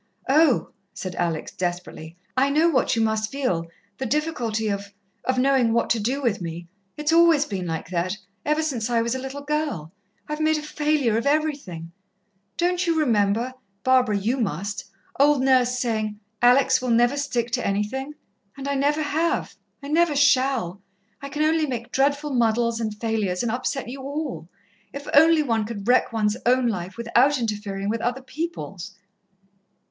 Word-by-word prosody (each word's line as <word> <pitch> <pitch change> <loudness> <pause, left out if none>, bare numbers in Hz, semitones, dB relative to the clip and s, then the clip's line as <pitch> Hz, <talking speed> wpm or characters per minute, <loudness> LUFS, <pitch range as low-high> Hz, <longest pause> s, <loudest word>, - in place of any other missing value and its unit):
"Oh," 295 -2 +4 0.2
said 185 -1 -5
Alex 170 -3 -2
desperately, 175 -2 -5 0.2
"I 265 +2 +3
know 310 +4 +3
what 260 -7 +2
you 225 - +2
must 220 0 0
feel 215 -12 -1 0.3
the 265 - -2
difficulty 235 -7 -1
of 200 -1 -3 0.3
of 255 0 0
knowing 255 -3 +3
what 235 - +1
to 230 - +2
do 260 +7 -1
with 220 -6 0
me. 170 0 -6 0.3
It's 300 +1 0
always 330 -3 +5
been 190 -8 -4
like 165 +1 -4
that, 185 +3 -1 0.3
ever 305 +1 +1
since 245 -7 -2
I 230 -1 +2
was 235 +1 -1
a 260 - -2
little 270 +2 -6
girl. 290 - -2 0.4
I've 300 0 -4
made 310 0 +2
a 300 - -5
failure 295 -7 +1
of 245 - -3
everything. 280 - -1 0.7
Don't 355 +1 +1
you 330 -1 +2
remember 230 -2 +1 0.3
Barbara, 255 -5 +3
you 225 +7 0
must 205 - -3 0.3
old 285 -1 +4
Nurse 250 -2 +3
saying, 215 -4 -2 0.2
'Alex 250 +2 +5
will 255 - -2
never 240 +3 +3
stick 245 -5 -2
to - - -1
anything'? 245 +9 -2 0.4
And 275 0 -6
I 280 - 0
never 290 +3 +1
have, 320 +3 -1 0.3
I - - -6
never 320 +1 +2
shall. 260 -9 +2 0.4
I 280 - -6
can 300 +2 -1
only 315 0 +2
make 235 -3 -5
dreadful 285 +2 +1
muddles 235 -1 +1
and 215 -2 -4
failures, 215 -5 -1
and 235 - 0
upset 255 +2 -2
you 265 +3 -7
all. 280 - -5 0.4
If 280 +1 -7
only 320 +1 +6
one 225 -5 0
could 210 -1 -6
wreck 250 +1 +3
one's 215 -1 0
own 255 +1 +4
life 190 -3 -3
without 240 +5 +3
interfering 205 -4 -3
with 225 +2 -1
other 245 +3 -2
people's!" 260 - -6
250 Hz, 170 wpm, -24 LUFS, 215-285 Hz, 0.7 s, only